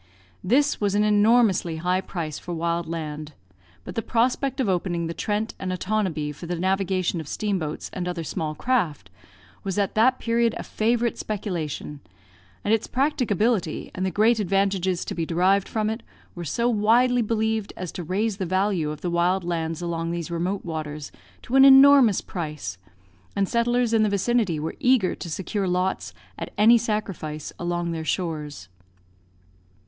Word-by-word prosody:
This 280 +8 +2
was 205 -1 +1
an 210 - +3
enormously 210 -4 +3
high 180 +3 0
price 160 -6 -5
for 175 - -6
wild 170 +1 -1
land; 155 -2 -5 0.5
but - - -7
the 225 - -1
prospect 255 +4 0
of 255 - +1
opening 175 -2 0
the 165 - -3
Trent 215 +4 -2
and 185 -1 -3
Otonabee 185 -6 -1
for 160 +4 -9
the 175 - -2
navigation 185 -1 0
of 155 - -10
steamboats 180 -5 -2
and 180 -2 -3
other 175 -2 -3
small 155 0 -3
craft, 170 - -1 0.5
was 195 -1 -3
at 200 -2 +1
that 255 +4 +4
period 230 -1 +1
a - - -5
favourite 235 +1 0
speculation, 170 -8 -4 0.6
and 210 - +2
its 225 - +1
practicability, 240 - 0
and 185 - -3
the 190 - +1
great 220 +5 +3
advantages 195 -2 0
to - - -4
be 165 - -2
derived 185 +4 +2
from 215 -1 -1
it, 220 +2 -2 0.3
were 175 - -6
so 235 - 0
widely 240 +3 +3
believed 220 -1 -1
as 180 -2 -5
to - - -6
raise 195 +5 -1
the 190 - -2
value 185 -3 +1
of 150 0 -6
the 175 - -2
wild 175 +2 +2
lands 165 -1 -2
along 165 -1 -2
these 170 0 -4
remote 180 +4 -2
waters 155 -3 -5 0.3
to 250 - -3
an 270 - +8
enormous 270 -5 +8
price; 150 - -5 0.6
and 200 -1 +1
settlers 235 +1 +1
in 225 - +4
the 215 - +3
vicinity 200 -4 +1
were 160 +2 -4
eager 250 -7 +3
to 170 - -7
secure 190 +4 -2
lots, 180 +1 -1 0.3
at - - -5
any 220 +3 +7
sacrifice, 195 -9 -3
along 175 0 -2
their 165 -1 -3
shores. 155 - -3
190 Hz, 165 wpm, -24 LUFS, 170-220 Hz, 0.6 s, an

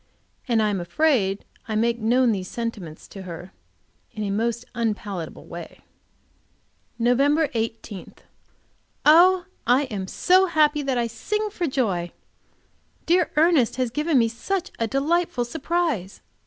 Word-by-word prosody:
And 230 -3 +2
I 210 - +2
am 195 - -1
afraid 195 - +1 0.2
I 215 - -2
make 235 +2 +1
known 240 +2 +3
these 190 -3 -3
sentiments 205 -10 -6
to 195 - -9
her 180 0 -8 0.6
in 215 - -4
a 200 - -2
most 230 +3 -1
unpalatable 210 -7 -4
way. - - -9 1.2
Nov. 245 +2 +2 0.3
18. 225 -3 -5 0.9
Oh, 355 +4 +6 0.2
I 250 +4 +4
am 205 -8 -5
so 370 - +3
happy 300 -3 +3
that 270 -3 -1
I 240 - +1
sing 425 - -3
for 355 -4 -2
joy! 195 - -1 0.9
Dear 350 0 +3
Ernest 310 -6 +3
has 255 -2 -1
given 300 +3 +1
me 230 -2 +4
such 335 - -3
a 230 - +1
delightful 280 0 0
surprise! 315 - -2
235 Hz, 135 wpm, -24 LUFS, 210-305 Hz, 1.2 s, Oh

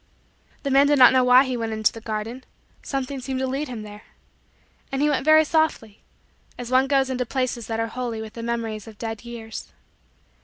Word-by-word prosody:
The 280 - -2
man 275 +1 +5
did 290 0 +3
not 255 -1 +8
know 260 -1 +4
why 250 +1 +7
he 260 -1 -2
went 225 -2 -3
into 215 -1 +1
the 225 - -9
garden. 225 +3 -5 0.4
Something 270 0 -4
seemed 260 0 -4
to 265 - 0
lead 270 +3 -2
him 235 -4 -6
there. 210 0 -11 0.9
And 270 - -2
he 295 +1 +3
went 275 - 0
very 310 0 +6
softly 300 -10 0 0.6
as 245 0 -7
one 260 +1 +4
goes 270 -1 +2
into 255 -1 -1
places 250 -2 -3
that 225 -1 -3
are 225 - +1
holy 235 0 -4
with 220 0 -8
the 230 - -7
memories 230 -2 -4
of 220 -2 -12
dead 225 0 -5
years. 230 -2 -8
250 Hz, 205 wpm, -23 LUFS, 225-270 Hz, 0.9 s, not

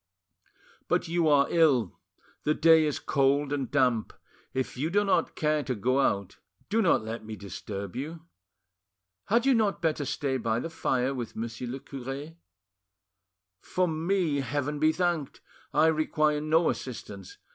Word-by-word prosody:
But - - +1
you 170 0 +1
are 145 -2 +5
ill, 140 - +3 0.4
the 150 - +1
day 160 -1 +6
is 150 - -1
cold 140 +1 +1
and 135 -3 -2
damp; 125 -6 +1 0.4
if 130 0 -3
you 145 +6 -1
do 205 +4 +2
not 195 - +1
care 155 -1 +1
to 130 -3 -3
go 130 +6 +1
out, 100 -7 0 0.3
do 225 +3 +2
not 170 - +3
let 110 +1 -5
me 110 0 -7
disturb 100 -1 -7
you. 155 +5 -5 1.0
Had 235 +4 +2
you 270 - +5
not 215 -4 +1
better 155 -3 0
stay 135 0 -1
by 115 -2 -1
the 165 - -5
fire 130 -3 0
with 120 -4 -5
Monsieur 115 +2 -5
le 130 +3 -5
cure? 135 +4 -7 1.3
For 180 - 0
me, 165 -1 0
Heaven 145 +2 -2
be 155 +1 +4
thanked! 170 -5 -1 0.3
I 155 - +4
require 155 -1 +2
no 160 +2 +3
assistance. 100 -6 -8
145 Hz, 155 wpm, -28 LUFS, 125-160 Hz, 1.3 s, day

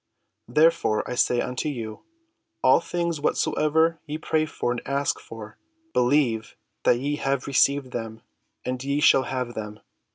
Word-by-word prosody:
Therefore 150 -4 +2
I - - -3
say 120 0 +2
unto 125 +4 -2
you, 115 -6 -6 0.6
All - - +6
things 170 -3 -2
whatsoever 160 +2 +1
ye 150 +1 -3
pray 155 0 0 0.2
and 120 0 0
ask 140 +1 -1
for, 110 -1 -11 0.3
believe 125 -4 +1 0.3
that 120 - +5
ye 145 +4 -2
have 135 -2 -1
received 140 -1 +2
them, 115 -1 -6 0.4
and 125 0 -3
ye 140 +1 0
shall 135 -3 +5
have 125 -2 -3
them. 105 -1 -6
135 Hz, 140 wpm, -25 LUFS, 120-150 Hz, 0.6 s, All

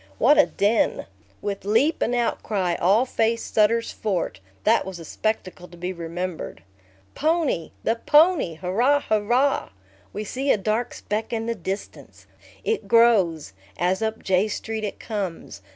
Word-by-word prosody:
What 295 +6 +5
a 295 - +6
din! 210 +3 +1 0.4
With 200 -1 -3
leap 230 - +2
and 245 - +1
outcry, 205 -6 0
all 205 +8 +4
faced 230 -2 -1
Sutter's 230 +2 +3
Fort. 190 - -2 0.2
That - - +4
was 190 -2 -7
a 165 - -10
spectacle 185 -2 -3
to 175 - -15
be 180 +2 -4
remembered. 170 0 -5 0.5
Pony! 310 - 0
The 225 - +1
pony, 295 - +4
hurrah, 230 - +2
hurrah! 240 +6 +1 0.4
We 210 - -4
see 265 +6 -1
a - - +3
dark 220 +4 -1
speck 215 +1 -3
in 225 -1 -2
the 230 - -1
distance. 195 -1 -7 0.4
It 445 -1 -1
grows, 195 - +3 0.2
as 185 +3 0
up 220 0 -2
J 190 +2 +2
Street 220 +1 -4
it 205 - -4
comes. 190 - -5
215 Hz, 150 wpm, -24 LUFS, 185-235 Hz, 0.5 s, a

